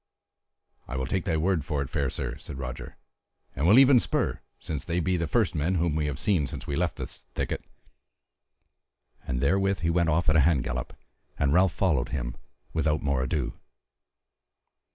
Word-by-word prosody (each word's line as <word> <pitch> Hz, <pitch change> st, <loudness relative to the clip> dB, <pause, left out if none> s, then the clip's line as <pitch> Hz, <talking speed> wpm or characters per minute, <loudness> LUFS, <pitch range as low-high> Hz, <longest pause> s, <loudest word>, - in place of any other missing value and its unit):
"I 65 Hz, -, -4 dB
will 65 Hz, -, -1 dB
take 95 Hz, +7 st, -1 dB
thy 80 Hz, -4 st, +1 dB
word 85 Hz, -1 st, +1 dB
for 75 Hz, 0 st, -2 dB
it, 65 Hz, -, -8 dB
fair 70 Hz, -2 st, 0 dB
sir," -, -, -4 dB
said -, -, -8 dB
Roger, 65 Hz, -2 st, -6 dB, 0.6 s
"and 75 Hz, +6 st, +1 dB
will 105 Hz, +6 st, +7 dB
even 135 Hz, -1 st, +8 dB
spur, -, -, -1 dB, 0.2 s
since 75 Hz, -4 st, -5 dB
they 85 Hz, +1 st, -1 dB
be 90 Hz, +2 st, +1 dB
the 85 Hz, -2 st, -1 dB
first 75 Hz, -, +1 dB
men 80 Hz, +5 st, 0 dB
whom 85 Hz, -2 st, +1 dB
we 75 Hz, -1 st, 0 dB
have 70 Hz, -3 st, -3 dB
seen 90 Hz, -9 st, +1 dB
since -, -, -6 dB
we 70 Hz, -, -3 dB
left 85 Hz, +2 st, 0 dB
the -, -, -4 dB
thickets." -, -, -5 dB, 1.6 s
And 60 Hz, -1 st, -1 dB
therewith 95 Hz, +6 st, +2 dB
he 85 Hz, 0 st, +1 dB
went 85 Hz, -1 st, +2 dB
off 85 Hz, +3 st, +1 dB
at 75 Hz, -, +4 dB
a -, -, +6 dB
hand 75 Hz, -3 st, +3 dB
gallop, 65 Hz, 0 st, -4 dB, 0.4 s
and 70 Hz, 0 st, +2 dB
Ralph 90 Hz, +1 st, +4 dB
followed 80 Hz, -11 st, +1 dB
him -, -, -3 dB, 0.4 s
without 80 Hz, -1 st, +1 dB
more 70 Hz, -2 st, +1 dB
ado. 65 Hz, +1 st, -2 dB
80 Hz, 185 wpm, -27 LUFS, 70-90 Hz, 1.6 s, even